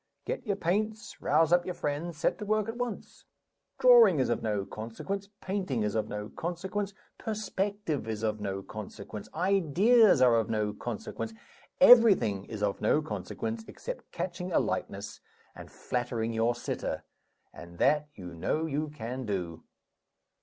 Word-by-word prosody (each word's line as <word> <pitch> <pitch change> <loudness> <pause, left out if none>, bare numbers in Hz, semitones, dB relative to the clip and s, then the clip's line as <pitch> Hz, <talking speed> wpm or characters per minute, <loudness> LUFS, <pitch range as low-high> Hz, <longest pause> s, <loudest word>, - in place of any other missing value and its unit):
Get - - -4
your 200 - +1
paints, 210 +5 -2
rouse 160 +3 +3
up 175 0 +5
your 180 0 -4
friends, 150 +3 -3
set - - 0
to 210 - -5
work 215 -1 +1
at 225 - -4
once. 240 -3 -5 0.5
Drawing 235 - +7
is 130 - +1
of 120 - 0
no 105 -3 -1
consequence; 190 - -5
painting 185 - -1
is 105 -1 -1
of 110 -1 -1
no 105 +1 -5
consequence; 190 +4 -4 0.2
perspective 205 - -2
is 110 0 -4
of 110 -1 -1
no 95 -1 -3
consequence; 105 0 -8
ideas 195 - +4
are 125 -2 +6
of 115 -1 0
no 105 -2 0
consequence. 115 0 -5 0.5
Everything 200 - +7
is 105 -2 -6
of 100 -1 -1
no 155 - +3
consequence, 225 +8 -4
except - - -8
catching 180 0 -4
a - - +4
likeness - - -3 0.4
and - - -10
flattering 120 -2 -2
your 115 +2 +1
sitter 120 - -4 0.5
and 85 0 -11
that 150 - +3
you 90 -3 -9
know 155 - -1
you 155 0 -2
can 130 -2 -5
do." 90 -5 -3
150 Hz, 155 wpm, -29 LUFS, -, 0.5 s, Drawing